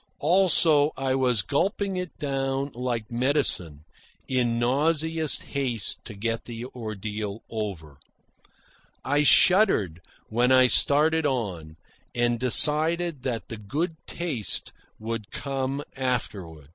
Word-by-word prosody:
Also, 160 -3 +4
I 135 -1 -1
was 125 -6 +1
gulping 195 - -1
it 180 -2 -5
down 135 0 -2
like 120 -2 -4
medicine, 120 - 0 0.4
in 120 -3 0
nauseous 155 +4 +1
haste 125 -7 -3
to 110 - -8
get 115 +3 -3
the 120 0 -7
ordeal 110 -3 -6
over. 90 -10 -6 1.1
I 145 +2 +2
shuddered 150 - +4 0.3
when 120 +3 +1
I 130 0 +6
started 150 +4 +4
on, 90 - -4 0.4
and 120 -1 +1
decided 155 +5 +3
that 120 -3 -4
the 115 - -7
good 150 - -3
taste 150 - -2 0.2
would 110 -1 -5
come 135 0 -3
afterward. 100 - -4
130 Hz, 110 wpm, -25 LUFS, 110-145 Hz, 1.1 s, I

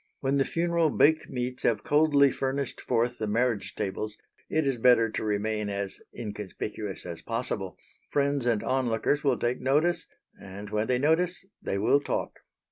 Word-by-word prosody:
When 135 +1 +1
the 135 - +3
funeral 170 -1 +1
baked 155 +2 +3
meats 125 0 -3
have 115 - +1
coldly 145 -2 +4
furnished 135 0 -2
forth 120 +2 0
the 110 - -1
marriage 115 0 0
tables, 105 +2 -3 0.3
it 155 -1 +1
is 135 -2 +1
better 115 -2 +5
to - - -3
remain 105 0 -1
as 100 -1 -4
inconspicuous 105 -1 -6
as 85 -2 -6
possible; 115 -5 -3 0.3
friends 140 -3 +1
and 115 -3 +1
onlookers 130 +2 +1
will 140 - +2
take 120 +1 -1
notice, 150 +7 +2 0.3
and, 100 +1 -9
when 105 +1 0
they 125 - +2
notice, 170 +7 +2 0.2
they 100 - -2
will 110 +8 +4
talk. 145 - -3
125 Hz, 160 wpm, -28 LUFS, 105-140 Hz, 0.3 s, better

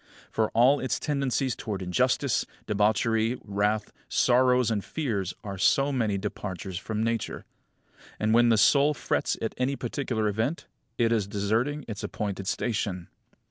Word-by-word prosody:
For 110 -1 +1
all 130 +5 +5
its 130 -4 -1
tendencies 135 -4 0
towards 100 -3 -4
injustice, 90 -1 +1 0.2
debauchery, 110 +3 +1
wrath, 105 +1 -1 0.2
sorrows, 125 -1 +3
and 105 -3 -1
fears 105 - -3
are 100 -2 -6
so 135 +9 +3
many 110 -7 0
departures 95 -2 -5
from 110 +1 -3
Nature. 115 -2 -2 0.7
And, 110 +1 +1
when 120 +1 +5
the 115 - +4
soul 140 +7 +4
frets - - -1
at 110 - -2
any 130 +2 +1
particular 120 -3 -2
event, 110 +10 -1 0.3
it 115 -1 +2
is 110 -4 +1
deserting 110 +8 -1
its 105 -3 -5
appointed 100 -2 -4
station. 100 -7 -2
110 Hz, 140 wpm, -27 LUFS, 105-125 Hz, 0.7 s, all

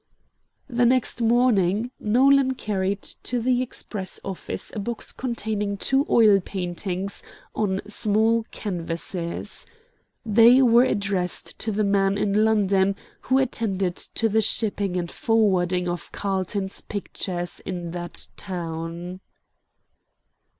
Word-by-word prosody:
The 245 -2 +1
next 250 -1 +1
morning 230 -2 +3
Nolan 260 +4 +4
carried 200 -3 -2
to 245 - -3
the 250 +1 +2
express 205 -6 -5
office 195 -2 -5
a - - -2
box 230 +2 -2
containing 215 -5 -2
two 270 +7 +1
oil 215 -4 +6
paintings 185 +1 -3 0.3
on 195 -3 0
small 220 +2 +2
canvases. 170 -2 -4 0.6
They 230 +4 +7
were 240 0 +6
addressed 200 -6 -2
to 220 - -2
the 210 +1 0
man 200 -1 +2
in 210 +1 +2
London 200 -3 +3 0.3
who 260 - +5
attended 200 -8 0
to 225 - -1
the 220 +1 +2
shipping 205 -4 0
and 170 -1 -3
forwarding 185 -5 +1
of 175 -4 -4
Carlton's 190 0 -2
pictures 180 -3 -4
in 175 -2 -5
that 175 0 -4
town. 170 0 -5
200 Hz, 115 wpm, -24 LUFS, 185-230 Hz, 0.6 s, They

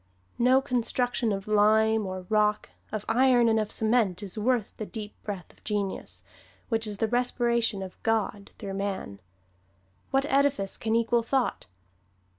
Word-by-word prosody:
No 255 +2 +5
construction 245 -1 0
of 195 0 -3
lime, 215 0 +3
or 185 -1 -5
rock, 210 0 +1 0.2
of 215 -1 -4
iron 245 0 +4
and 220 -1 +3
of 215 -1 -2
cement 220 -4 +1
is 195 - -5
worth 230 0 0
the 215 - -4
deep 210 -3 -7
breath 195 -5 -6
of - - -28
genius, 205 -2 -2 0.5
which 225 -2 0
is 205 -1 -5
the 225 - +1
respiration 235 -3 +1
of 185 -1 -10
God 215 -3 -1
through 200 -3 -6
man. 195 - -4 0.9
What 270 +1 +2
edifice 275 -8 +1
can 220 0 -1
equal 230 +1 +2
thought? 255 +2 -1
220 Hz, 150 wpm, -27 LUFS, 205-240 Hz, 0.9 s, No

